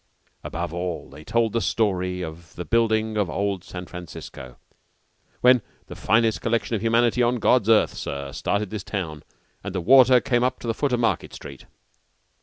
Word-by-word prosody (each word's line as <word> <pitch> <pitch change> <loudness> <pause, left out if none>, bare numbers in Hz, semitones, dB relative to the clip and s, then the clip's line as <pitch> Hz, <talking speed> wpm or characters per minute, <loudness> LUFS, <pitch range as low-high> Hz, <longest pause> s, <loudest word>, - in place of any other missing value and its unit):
Above 85 0 -4
all, 90 -5 -4
they 75 +3 -12
told 115 +4 0
the 115 - +1
story 90 -3 0
of 85 +1 -9
the 90 - -6
building 110 -1 +1
of 100 -5 +1
old 100 0 -2
San 90 0 -8
Francisco, 70 -8 -10 0.8
when 125 -1 +6 0.2
the - - -10
"finest 110 0 +2
collection 115 0 0
of 105 - -3
humanity 115 +2 +2
on 120 +1 +2
God's 115 -1 +2
earth, 110 -2 +4
sir, 70 0 -5
started 100 +7 -2
this 105 -3 -5
town, 80 -8 -4 0.4
and 100 -1 -6
the - - 0
water 130 +5 +6
came 120 0 0
up 130 - 0
to - - -10
the 115 - +1
foot 140 +4 -1
of 125 - +1
Market 115 - -1
Street." 70 - -11
105 Hz, 180 wpm, -24 LUFS, 90-115 Hz, 0.8 s, when